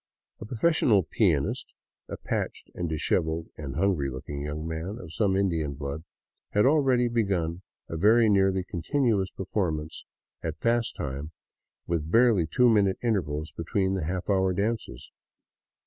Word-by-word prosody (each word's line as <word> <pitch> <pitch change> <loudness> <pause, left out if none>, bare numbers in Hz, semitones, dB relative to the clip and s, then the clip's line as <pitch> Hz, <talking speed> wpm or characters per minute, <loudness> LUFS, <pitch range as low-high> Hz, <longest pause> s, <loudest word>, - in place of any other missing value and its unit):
A - - -7
profes 155 +9 +1
sional 100 -7 +4
pianist, - - +1 0.4
a - - -5
patched, - - -4
dishevelled, 80 -1 -1
and 70 -3 -6
hungry 90 -9 +1
looking 70 +2 -6
young 75 +2 -4
man 80 +6 -4
of 85 -5 -10
some 100 -3 +1
Indian 80 -7 0
blood, 70 +2 -5 0.5
had 105 - +4
already 135 -4 +4
begun 95 -7 -1 0.3
a 80 - -5
very 110 +6 +5
nearly 95 -2 +3
continuous 100 - 0
per 95 - -7
formance 80 -7 -2 0.4
at - - -4
fast 115 0 +1
time, 70 +4 -5 0.5
with 80 -2 -2
barely 115 -5 +4
two 125 +10 +3
minute 100 -4 +3
intervals 80 -9 -1
between 95 +3 -1
the 95 -5 -2
half 90 +2 -3
hour 95 -2 +2
dances. 105 - -3
95 Hz, 145 wpm, -27 LUFS, 80-110 Hz, 0.5 s, very